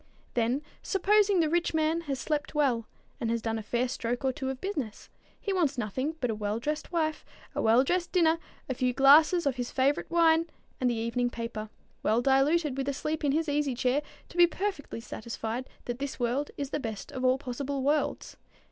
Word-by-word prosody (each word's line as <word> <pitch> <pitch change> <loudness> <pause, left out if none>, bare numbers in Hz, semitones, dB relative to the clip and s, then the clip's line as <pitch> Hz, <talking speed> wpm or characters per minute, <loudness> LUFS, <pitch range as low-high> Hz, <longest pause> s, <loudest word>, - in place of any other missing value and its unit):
Then 245 +5 +1 0.2
supposing 400 -1 +3
the 320 - +2
rich 340 +1 +1
man 320 +1 +2
has 270 - 0
slept 300 -1 -2
well, 255 -7 +2 0.3
and 230 - -1
has 230 0 +1
done 225 0 -2
a - - -4
fair 240 +4 0
stroke 245 0 -3
or 265 - +3
two 265 -2 -3
of 265 -1 -4
business, 285 - -4 0.3
he 400 - -2
wants 310 -7 +1
nothing 260 +7 -2
but 250 -5 0
a - - -1
well 210 0 -2
dressed 300 +7 -3
wife, 315 -3 0 0.3
a - - -1
well 230 +4 +5
dressed 350 +4 0
dinner, 330 -2 +3 0.3
a 260 - -1
few 250 0 0
glasses 305 +6 +6
of 270 -3 +1
his 245 -1 -2
favorite 275 +2 +1
wine, 330 -1 +4 0.3
and 255 - +2
the 240 - 0
evening 235 +2 0
paper, 230 -2 -5 0.3
well 220 +2 +2
diluted 275 +2 +3
with 270 0 -1
a - - 0
sleep 305 +3 -3
in 285 - +3
his 320 +3 +1
easy 290 -3 0
chair, 255 +4 +1 0.3
to - - -11
be 350 0 +8
perfectly 370 - -4
satisfied 230 +2 -5 0.2
that 240 +1 -4
this 280 -1 -4
world 250 +4 0
is 280 -1 -4
the 295 - -1
best 220 -6 -5
of 260 - -5
all 255 0 +4
possible 270 +1 -3
worlds. 295 +2 0
275 Hz, 205 wpm, -29 LUFS, 240-315 Hz, 0.3 s, be